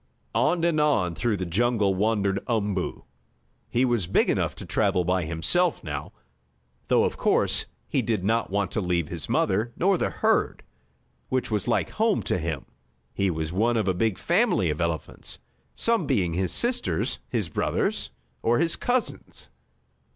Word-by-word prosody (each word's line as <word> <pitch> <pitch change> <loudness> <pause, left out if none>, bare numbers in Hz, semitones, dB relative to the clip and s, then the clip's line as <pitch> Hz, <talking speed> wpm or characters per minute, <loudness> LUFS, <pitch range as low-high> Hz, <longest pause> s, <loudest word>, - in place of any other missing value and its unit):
On 165 +2 +2
and 170 -2 +2
on 115 - +2
through 110 +4 0
the 90 - -3
jungle 105 +2 +1
wandered 100 -1 0
Umboo. 105 -5 -1 0.7
He 125 +2 +2
was 120 -8 0
big 95 - +3
enough - - -1
to - - -9
travel 100 -4 +1
by 90 0 0
himself 85 - +1
now, 75 -4 -5 0.8
though - - +4
of - - -1
course - - +2 0.2
he - - +1
did 110 -5 -1
not 115 +3 +1
want 100 -1 -1
to 110 - -1
leave 85 -4 0
his 80 -7 -6
mother, 110 +5 +1
nor 190 0 +2
the - - +1
herd, - - +1 0.7
which 130 -2 -1
was 105 -3 -1
like - - +1
home 220 -1 +1
to - - -1
him. 80 -4 -3 0.5
He 100 +5 +1
was 80 -1 -3
one 115 +5 +2
of 105 -3 0
a 95 - +3
big 105 +2 0
family 175 - +2
of 75 - -4
elephants, 85 -2 -4 0.4
some 230 -1 +1
being 95 - +1
his 90 +1 -1
sisters, 240 - 0
his 110 -7 -1
brothers - - -1 0.3
or 120 +1 +2
his 165 0 +2
cousins. 245 0 -2
100 Hz, 165 wpm, -26 LUFS, 90-125 Hz, 0.8 s, though